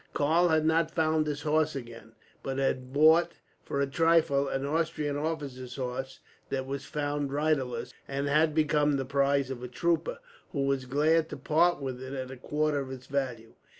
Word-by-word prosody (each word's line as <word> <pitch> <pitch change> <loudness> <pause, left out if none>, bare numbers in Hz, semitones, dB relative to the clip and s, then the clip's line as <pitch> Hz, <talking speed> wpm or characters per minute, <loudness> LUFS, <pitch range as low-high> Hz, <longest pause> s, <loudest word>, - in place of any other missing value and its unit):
Karl 160 +5 +3
had 160 -2 +2
not 160 0 +3
found 155 -1 +1
his 145 -1 -3
horse 155 0 +1
again, 115 -3 -9 0.3
but 135 0 -4
had 130 -1 -1
bought, 160 +4 +5 0.3
for 140 - -3
a 140 - +3
trifle, 155 -1 +3
an 135 0 -2
Austrian 150 -1 -1
officer's 145 -5 -4
horse 130 0 -4 0.3
that 130 -1 -2
was 135 +1 -5
found 145 -1 -2
riderless; 130 -5 -1
and 140 +1 -2
had 155 +1 +3
become 150 -1 +3
the 135 -1 -1
prize 140 0 +1
of 125 -2 -6
a 125 - -5
trooper, 170 - 0 0.4
who 140 - 0
was 135 -1 0
glad 155 +5 +2
to - - -6
part 175 0 +2
with 130 -2 -4
it 130 +1 -7
at 130 -1 -5
a - - -7
quarter 150 +3 0
of 135 -1 -5
its 130 -1 -8
value. 125 -5 -3
140 Hz, 185 wpm, -29 LUFS, 130-155 Hz, 0.4 s, bought